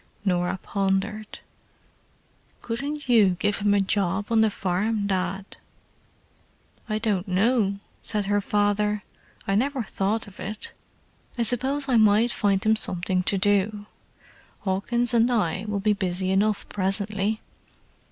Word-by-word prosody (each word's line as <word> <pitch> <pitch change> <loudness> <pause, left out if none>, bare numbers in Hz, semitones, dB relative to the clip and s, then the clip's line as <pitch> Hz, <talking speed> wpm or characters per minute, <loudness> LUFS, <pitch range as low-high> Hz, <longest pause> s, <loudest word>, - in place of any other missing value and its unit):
Norah 180 -1 +1
pondered. 200 +2 -2 1.2
"Couldn't 280 +5 -4
you 210 -7 +4
give 205 +3 0
him 205 0 +2
a - - +3
job 195 +1 0
on 225 -1 +4
the 220 - +4
farm, 200 +3 -1
Dad?" 190 0 -3 1.3
"I 215 - 0
don't 210 -4 -1
know," 200 +1 +2 0.2
said 210 -2 0
her 205 +1 +1
father. 205 0 0 0.4
"I 195 - +1
never 260 +4 0
thought 205 +2 -2
of 195 - -14
it. 210 +3 -6 0.6
I 235 - +1
suppose 265 +5 +1
I 250 -3 +3
might 215 +2 +4
find 200 -4 +1
him 220 0 +4
something 185 -3 0
to 195 +2 0
do; 205 +1 +1 0.8
Hawkins 235 +5 0
and 235 +1 +4
I 215 -4 0
will 205 -1 -1
be 210 +1 +2
busy 185 -1 -1
enough 205 +2 +1
presently." 200 +2 0
205 Hz, 130 wpm, -25 LUFS, 195-220 Hz, 1.3 s, you